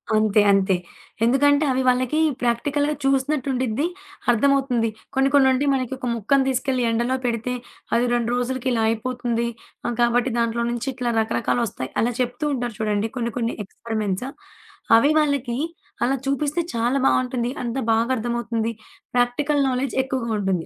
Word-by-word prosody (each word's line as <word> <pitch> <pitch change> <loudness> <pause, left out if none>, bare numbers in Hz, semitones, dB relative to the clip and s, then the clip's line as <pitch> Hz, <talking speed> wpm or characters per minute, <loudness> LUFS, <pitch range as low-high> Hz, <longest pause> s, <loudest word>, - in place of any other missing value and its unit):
అంతే. 215 -1 +4
అంతే. 195 -1 +3 0.5
ఎందుకంటే 285 +4 +4
అవి 260 0 +1
వాళ్ళకి 255 +4 +2 0.2
ప్రాక్టికల్‌గా 285 +5 +1
చూసినట్టుండిద్ది 270 -1 0 0.4
అర్థమవుతుంది. 250 -2 +2 0.3
కొన్ని 270 +1 +3
కొన్ని 280 -2 +6
ఉండి 265 +3 +1
మనకి 260 -1 -1
ఒక 255 -1 -5
ముక్కని 265 +5 +2
తీసుకెళ్లి 260 -1 0
ఎండలో 240 +3 +1
పెడితే 240 +1 -1 0.4
అది 240 - +3
2 240 -1 0
రోజులకిలా 250 -1 0
అయిపోతుంది. 235 0 -1 0.4
ఆహ్, 240 - -1
కాబట్టి 240 +1 +2
దాంట్లో 235 0 0
నుంచి 240 +3 -3
ఇట్లా 245 -1 -2
రకరకాలోస్తాయి. 215 - -1
అలా 240 +2 +1
చెప్తూ 250 +4 -2
ఉంటారు 245 -4 -3
చూడండి 215 0 0
కొన్ని 235 -1 -2
కొన్ని 230 0 -1
ఎక్స్పరిమెంట్స్. 215 0 -3 0.7
అవి 285 +6 +4
వాళ్ళకి 280 -5 0 0.5
అలా 265 +3 +2
చూపిస్తే 285 +4 0
చాలా 240 +4 +1
బావుంటుంది. 250 -2 +1
అంత 240 +1 -3 0.2
బాగా 230 +3 +1
అర్థమవుతుంది. 230 -1 -2 0.4
ప్రాక్టికల్ 265 +4 +1
నాలెడ్జ్ 255 0 -1
ఎక్కువగా 260 -3 -3
ఉంటుంది. 190 -4 -1
245 Hz, 135 wpm, -23 LUFS, 230-265 Hz, 0.7 s, కొన్ని